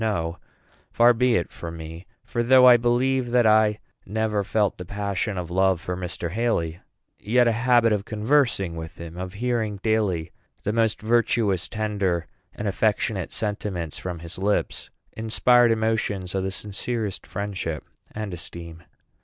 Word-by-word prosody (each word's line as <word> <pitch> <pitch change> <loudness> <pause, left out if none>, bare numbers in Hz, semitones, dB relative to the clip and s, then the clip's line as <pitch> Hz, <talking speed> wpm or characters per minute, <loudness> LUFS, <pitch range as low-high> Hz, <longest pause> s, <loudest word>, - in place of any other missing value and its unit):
No; 85 -6 -1 0.5
far 120 +1 +5
be 125 +1 +2
it 85 - -1
from 85 -1 -7
me; 80 +2 -9 0.2
for 120 - -2
though 125 +2 +6
I 125 - +9
believe 120 +2 +1
that 120 -1 +3
I 110 -1 +4 0.3
never 105 0 -1
felt 105 -1 0
the - - -4
passion 100 +1 -3
of 85 -2 -5
love 95 -1 +2
for 90 +1 -4
Mr. 90 -2 -4
Haly, 90 -7 -1 0.4
yet 120 +3 +3
a - - +4
habit 115 -1 +3
of 100 -2 -1
conversing 110 - +1
with 80 0 -8
him, 85 0 -8
of 90 0 -6
hearing 110 -2 -1
daily 100 -7 0 0.3
the 105 - -1
most 110 -2 +1
virtuous, 110 -5 +1
tender, 100 -6 -1 0.3
and 105 - -4
affectionate 100 -1 0
sentiments 100 -6 -3
from 90 -2 -5
his 85 +2 -8
lips, 100 +2 -1 0.2
inspired 120 +2 +3
emotions 110 -4 0
of 95 -1 -1
the - - -1
sincerest 105 +2 -4
friendship 95 -6 -4 0.3
and 105 -3 -5
esteem. 85 -1 -8
105 Hz, 155 wpm, -24 LUFS, 90-115 Hz, 0.5 s, I